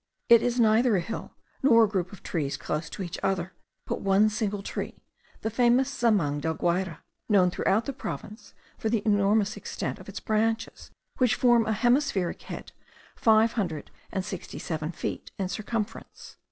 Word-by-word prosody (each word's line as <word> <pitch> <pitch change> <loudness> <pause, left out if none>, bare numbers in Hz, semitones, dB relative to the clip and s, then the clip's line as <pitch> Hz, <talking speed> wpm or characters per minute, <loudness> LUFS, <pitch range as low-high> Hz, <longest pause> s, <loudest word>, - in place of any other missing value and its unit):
It 235 -1 +8
is 245 0 0
neither 225 +1 +4
a - - +3
hill, 185 +7 -6 0.3
nor 230 -4 +6
a - - +4
group 190 -3 -2
of 200 - -12
trees 145 -4 -2
close 150 0 -3
to 195 - -5
each 175 -1 -5
other, 190 -1 -1 0.3
but - - -3
one 200 +2 +4
single 205 -2 -2
tree, - - -5 0.4
the 220 - -2
famous 245 +3 +3
zamang 205 - +1
del 160 +1 -1
Guayre, 175 0 -1 0.3
known 185 -4 +5
throughout 215 +5 +1
the 275 - -3
province 225 -4 -7 0.2
for 220 - -1
the 220 -2 0
enormous 205 0 +3
extent - - -4
of - - -11
its - - -6
branches, 225 +1 -1 0.3
which 250 -4 +4
form 240 -3 +4
a 220 - +2
hemispheric 240 - +1
head - - -8 0.4
five 220 0 +4
hundred 170 -9 -3 0.2
and 190 -1 -2
seventy 190 - -6
six 155 0 -4
feet - - -4
in 190 - -1
circumference. 215 +2 -5
210 Hz, 170 wpm, -27 LUFS, 185-230 Hz, 0.4 s, It